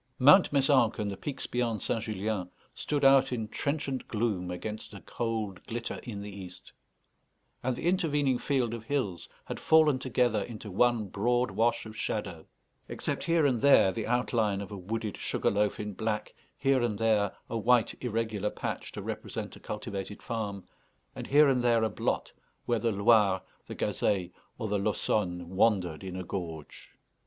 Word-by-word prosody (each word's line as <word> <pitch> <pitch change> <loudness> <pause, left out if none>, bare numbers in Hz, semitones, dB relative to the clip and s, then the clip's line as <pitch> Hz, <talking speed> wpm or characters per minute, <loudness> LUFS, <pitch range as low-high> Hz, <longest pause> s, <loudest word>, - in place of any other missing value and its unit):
Mount 160 +9 +7
Mézenc 135 -5 +3
and 105 -2 -2
the - - -4
peaks 140 +7 -5
beyond 120 -4 -1
St. 115 - 0
Julien 105 -3 -2 0.2
stood 145 -2 -1
out 135 -1 +6
in 115 -3 -2
trenchant 140 +1 -2
gloom 105 -5 -1
against 105 +4 -6
a 100 - -9
cold 110 -5 -3
glitter 115 0 -4
in 100 -4 -6
the 100 -1 -8
east; 90 -2 -10 0.9
and 125 0 -1
the - - -6
intervening 150 -8 +2
field 130 -5 0
of 115 -1 -6
hills 115 - -2 0.2
had - - -5
fallen 155 -4 +5
together 125 -1 +1
into 110 -3 -7
one 120 +2 +2
broad 120 +4 0
wash 115 +3 +1
of 110 0 -9
shadow, 90 -7 -4 0.4
except - - -3
here 165 -2 +3
and 130 -4 +2
there 135 -7 +6
the 110 +2 -4
outline 115 -4 +1
of 100 -1 -7
a - - -5
wooded 105 +2 -4
sugar - - 0
loaf 105 0 +1
in 105 -1 -4
black, 110 +1 -2 0.2
here 135 -1 +2
and 115 -4 0
there 110 -3 +2
a - - -5
white, 120 +1 +3
irregular 110 -3 -1
patch - - -5
to - - -6
represent - - -5
a - - -13
cultivated 105 -1 -6
farm, 105 -5 -4 0.5
and - - -6
here 150 +2 +6
and 130 -2 +3
there 120 -2 +3
a 110 - +2
blot - - -2 0.3
where 120 -2 +1
the 115 0 +1
Loire, 100 -2 +4 0.2
the - - -6
Gazeille, 95 -4 0 0.3
or 110 - -3
the 105 -1 0
Laussonne 90 -4 -1
wandered 95 -4 +1
in 95 -1 -6
a 95 - -4
gorge. 85 -4 -6
110 Hz, 170 wpm, -29 LUFS, 100-125 Hz, 0.9 s, Mount